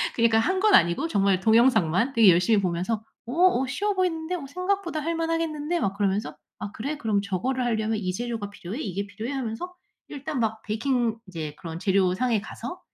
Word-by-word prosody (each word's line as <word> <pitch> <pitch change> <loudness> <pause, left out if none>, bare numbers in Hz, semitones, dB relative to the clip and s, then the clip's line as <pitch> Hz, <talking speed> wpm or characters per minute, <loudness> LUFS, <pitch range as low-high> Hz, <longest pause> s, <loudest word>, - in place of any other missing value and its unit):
그러니까 230 -1 +4
한 375 +10 +1
건 425 +1 +3
아니고 170 - +3
정말 195 - +2
동영상만 225 - +3
되게 225 -5 +7
열심히 185 +5 +4
보면서 185 +5 -1 0.2
어, 240 - -6
'어 345 -6 +4
쉬워 405 +10 -1
보이는데? 360 -2 -1
어 330 - -6
생각보다 365 +1 -2
할 330 +3 -2
만하겠는데?' 330 0 -1
막 195 -9 -1
그러면서 205 0 -1 0.2
'아 205 - -5
그래? 280 +7 -4
그럼 215 -7 0
저거를 205 +7 -1
하려면 220 -2 0
이 185 -3 -2
재료가 230 -1 -4
필요해? 200 +4 -7
이게 200 - -3
필요해?' 220 +5 -6
하면서 265 +7 -4 0.3
일단 290 0 -5
막 220 -1 -1
베이킹 230 +1 0
이제 160 -5 -6
그런 165 -1 -6
재료상에 195 +4 +2
가서 240 - -7
230 Hz, 415 characters per minute, -25 LUFS, 200-300 Hz, 0.3 s, 되게